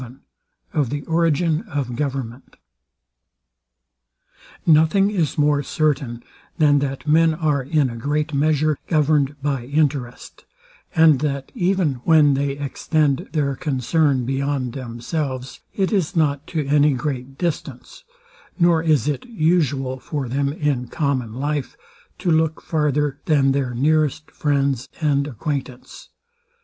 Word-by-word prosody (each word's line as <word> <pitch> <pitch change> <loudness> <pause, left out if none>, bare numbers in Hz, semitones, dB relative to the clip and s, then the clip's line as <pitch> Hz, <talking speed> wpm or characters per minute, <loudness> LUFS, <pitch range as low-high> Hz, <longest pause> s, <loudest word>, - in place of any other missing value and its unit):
VII 125 0 -9 0.6
OF 145 -6 +1
THE 145 +2 -4
ORIGIN 165 -1 +1
OF 135 -5 -3
GOVERNMENT 130 -2 -4 2.1
Nothing 165 +6 +4
is 170 -8 -1
more 145 -1 +3
certain, 140 -5 -1 0.3
than 145 -2 +4
that 135 0 -4
men 160 +1 +4
are, 150 -3 0
in 145 +1 +1
a 120 - -6
great 150 +6 -2
measure, 150 +1 +1
governed 150 -3 +1
by 135 -4 -1
interest, 140 -3 -2 0.5
and 160 -4 +6
that 140 -2 -3
even 180 - 0
when 155 -3 +5
they 140 0 0
extend 145 +1 -1
their 140 -3 0
concern 135 0 0
beyond 135 -1 -2
themselves, 130 +1 -4 0.2
it 195 0 0
is 185 -2 0
not 145 -3 +1
to 155 -4 -2
any 145 +1 +3
great 135 -1 -4
distance; 170 -4 -4 0.5
nor 170 -3 +4
is 155 -4 +2
it 145 -4 -1
usual 150 - 0
for 140 -1 -4
them, 140 +3 -1
in 145 -5 -1
common 130 -5 -1
life, 145 +3 -3 0.4
to 180 -2 -1
look 160 0 +1
farther 150 -2 0
than 140 -3 +3
their 135 -3 -1
nearest 155 +3 +1
friends 140 -3 0
and 145 -3 +1
acquaintance. 135 -1 -6
145 Hz, 125 wpm, -21 LUFS, 135-155 Hz, 2.1 s, and